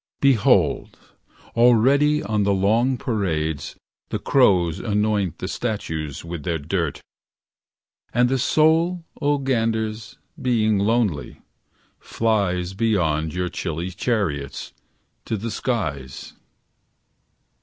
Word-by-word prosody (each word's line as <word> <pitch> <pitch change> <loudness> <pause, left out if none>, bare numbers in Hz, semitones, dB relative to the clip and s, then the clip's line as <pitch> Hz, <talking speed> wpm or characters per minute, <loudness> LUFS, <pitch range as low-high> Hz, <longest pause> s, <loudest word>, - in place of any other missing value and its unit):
Behold, 135 -7 +3 0.6
already 135 +6 +4
on 110 -6 0
the 100 0 +2
long 115 +7 +2
parades 80 - -2 0.3
The - - -1
crows 95 - +3
anoint 105 -4 0
the - - -5
statues 80 - -4
with 85 -1 -5
their 85 +2 -1
dirt. 80 0 -3 1.1
And 120 +1 +3
the 130 +1 0
soul, 165 +5 +2 0.2
0 145 0 +3
ganders, 115 -4 -2 0.2
being 110 -5 +2
lonely, 105 -7 0 0.6
flies 95 -5 -1
Beyond 90 -8 0
your 90 0 -1
chilly 85 0 -4
chariots, 90 - -2 0.5
to 110 - -2
the 115 +3 -4
skies. 75 - -3
105 Hz, 100 wpm, -22 LUFS, 85-120 Hz, 1.1 s, already